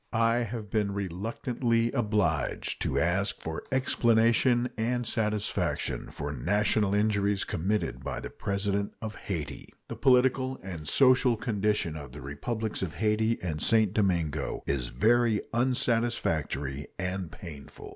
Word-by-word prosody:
I 115 Hz, +1 st, +3 dB
have 115 Hz, -3 st, -4 dB
been 105 Hz, -2 st, 0 dB
reluctantly 115 Hz, +5 st, -1 dB
obliged 105 Hz, -, 0 dB
to -, -, 0 dB
ask 95 Hz, +5 st, +1 dB, 0.4 s
explanation 120 Hz, -1 st, +3 dB
and 120 Hz, +2 st, -1 dB
satisfaction 105 Hz, -2 st, -1 dB
for 70 Hz, -, -5 dB
national 100 Hz, -, +1 dB
injuries 105 Hz, -1 st, +2 dB
committed 85 Hz, -, -2 dB
by -, -, -3 dB
the -, -, -7 dB
President 100 Hz, 0 st, -2 dB
of 110 Hz, -1 st, -5 dB
Hayti. 85 Hz, -9 st, -5 dB, 0.2 s
The -, -, -4 dB
political 130 Hz, 0 st, +3 dB
and 85 Hz, -5 st, -7 dB
social 130 Hz, -, +4 dB
condition 105 Hz, -7 st, 0 dB
of 75 Hz, -2 st, -8 dB
the -, -, -8 dB
Republics 105 Hz, -, -3 dB
of 90 Hz, -4 st, -3 dB
Hayti 110 Hz, +1 st, +1 dB
and 80 Hz, -4 st, -2 dB
St. 110 Hz, -3 st, +3 dB
Domingo 85 Hz, -9 st, 0 dB
is 65 Hz, -3 st, -1 dB
very 115 Hz, -, +3 dB
unsatisfactory 115 Hz, -, 0 dB
and 95 Hz, -2 st, -3 dB
painful. 80 Hz, -9 st, -10 dB
105 Hz, 125 wpm, -29 LUFS, 90-115 Hz, 0.4 s, social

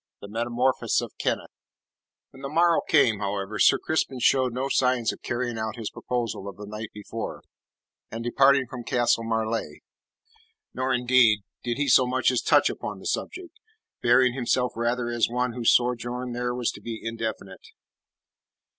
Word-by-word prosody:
THE -, -, -10 dB
METAMORPHOSIS 120 Hz, +4 st, 0 dB
OF -, -, -8 dB
KENNETH -, -, -2 dB, 0.8 s
When 135 Hz, -, -14 dB
the 140 Hz, -, -5 dB
morrow 170 Hz, +2 st, +3 dB
came, 120 Hz, -9 st, +4 dB
however, 100 Hz, +1 st, -3 dB
Sir -, -, +6 dB
Crispin 160 Hz, -4 st, -1 dB
showed 130 Hz, +1 st, +3 dB
no 130 Hz, +3 st, -2 dB
signs 125 Hz, -4 st, +1 dB
of -, -, -13 dB
carrying 120 Hz, -1 st, -3 dB
out 110 Hz, 0 st, -3 dB
his 115 Hz, -3 st, -5 dB
proposal 115 Hz, -5 st, -4 dB
of 100 Hz, -, -8 dB
the 105 Hz, -, -8 dB
night 105 Hz, +1 st, -7 dB
before, 110 Hz, +2 st, -7 dB, 0.7 s
and 115 Hz, +1 st, -6 dB
departing 135 Hz, +2 st, +4 dB
from 125 Hz, 0 st, -8 dB
Castle 120 Hz, -1 st, +1 dB
Marleigh. 115 Hz, 0 st, -2 dB, 0.9 s
Nor, 130 Hz, 0 st, -1 dB
indeed, 125 Hz, -4 st, +4 dB, 0.2 s
did 120 Hz, -1 st, -2 dB
he 145 Hz, 0 st, 0 dB
so 130 Hz, -1 st, +5 dB
much 130 Hz, +1 st, +2 dB
as 125 Hz, -, 0 dB
touch -, -, +4 dB
upon -, -, -4 dB
the -, -, -13 dB
subject, 370 Hz, -3 st, -4 dB, 0.5 s
bearing 125 Hz, +1 st, +4 dB
himself 125 Hz, -1 st, 0 dB
rather 120 Hz, +1 st, -1 dB
as 120 Hz, -1 st, +1 dB
one 125 Hz, 0 st, -1 dB
whose 120 Hz, -1 st, +2 dB
sojourn 125 Hz, 0 st, 0 dB
there 120 Hz, 0 st, -2 dB
was 125 Hz, -2 st, -1 dB
to -, -, -12 dB
be 115 Hz, -1 st, -6 dB
indefinite. 110 Hz, -5 st, -6 dB
120 Hz, 165 wpm, -25 LUFS, 115-130 Hz, 0.9 s, Sir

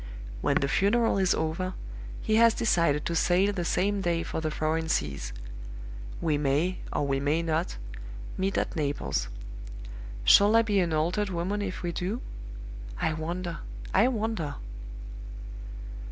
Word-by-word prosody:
When -, -, +2 dB
the 140 Hz, -, +1 dB
funeral 205 Hz, +7 st, +3 dB
is 190 Hz, -1 st, +4 dB
over, 170 Hz, +4 st, -1 dB, 0.5 s
he 215 Hz, -, +3 dB
has 230 Hz, 0 st, +6 dB
decided 170 Hz, -9 st, +2 dB
to 170 Hz, -, -1 dB
sail 185 Hz, +5 st, +3 dB
the 180 Hz, -3 st, -1 dB
same 200 Hz, +4 st, +1 dB
day 170 Hz, -2 st, +1 dB
for 160 Hz, -, -3 dB
the 155 Hz, -, 0 dB
foreign 160 Hz, +1 st, 0 dB
seas. 70 Hz, -, -1 dB, 0.9 s
We 155 Hz, -3 st, +1 dB
may, 150 Hz, +6 st, +1 dB
or -, -, 0 dB
we 135 Hz, -1 st, +1 dB
may 150 Hz, +4 st, +1 dB
not, 155 Hz, -, 0 dB, 0.6 s
meet 190 Hz, +1 st, 0 dB
at -, -, 0 dB
Naples. 145 Hz, -, -1 dB, 1.0 s
Shall 205 Hz, -, +7 dB
I 230 Hz, -, +7 dB
be 205 Hz, -3 st, +2 dB
an 175 Hz, -3 st, +2 dB
altered 175 Hz, +7 st, +1 dB
woman 185 Hz, +4 st, -1 dB
if 190 Hz, -3 st, -4 dB
we 175 Hz, -, 0 dB
do? 190 Hz, +7 st, -2 dB, 0.8 s
I 160 Hz, -, +1 dB
wonder; 170 Hz, +2 st, -3 dB, 0.3 s
I 210 Hz, +6 st, +6 dB
wonder!" 220 Hz, -, -1 dB
175 Hz, 145 wpm, -28 LUFS, 155-200 Hz, 1.0 s, Shall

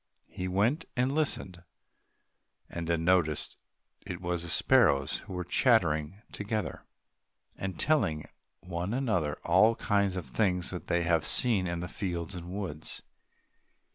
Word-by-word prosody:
He 90 Hz, -, -4 dB
went 115 Hz, -, +1 dB
and 125 Hz, +2 st, +2 dB
listened, 120 Hz, -, -1 dB, 1.1 s
and 85 Hz, -1 st, -4 dB
then 85 Hz, -1 st, 0 dB
noticed 85 Hz, -4 st, +2 dB, 0.5 s
that -, -, -5 dB
it 90 Hz, -, -8 dB
was 90 Hz, -1 st, -2 dB
the 85 Hz, -, -7 dB
sparrows 85 Hz, -, +3 dB
who -, -, -10 dB
were 90 Hz, 0 st, -3 dB
chattering 90 Hz, -, +2 dB
together, 105 Hz, +1 st, -4 dB, 0.7 s
and 95 Hz, -1 st, -5 dB
telling 80 Hz, -, +1 dB, 0.4 s
one 90 Hz, +4 st, -3 dB
another 105 Hz, -, 0 dB
of -, -, -13 dB
all 110 Hz, +7 st, +5 dB
kinds 100 Hz, -3 st, +1 dB
of 90 Hz, -4 st, -4 dB
things 90 Hz, -4 st, 0 dB
which 90 Hz, -, -6 dB
they 85 Hz, 0 st, +1 dB
had 85 Hz, -1 st, +2 dB
seen 100 Hz, 0 st, +3 dB
in 85 Hz, -1 st, -3 dB
the 90 Hz, -, -4 dB
fields 90 Hz, -3 st, -4 dB
and 90 Hz, -1 st, -7 dB
woods. 90 Hz, -5 st, -5 dB
90 Hz, 145 wpm, -30 LUFS, 85-105 Hz, 1.1 s, all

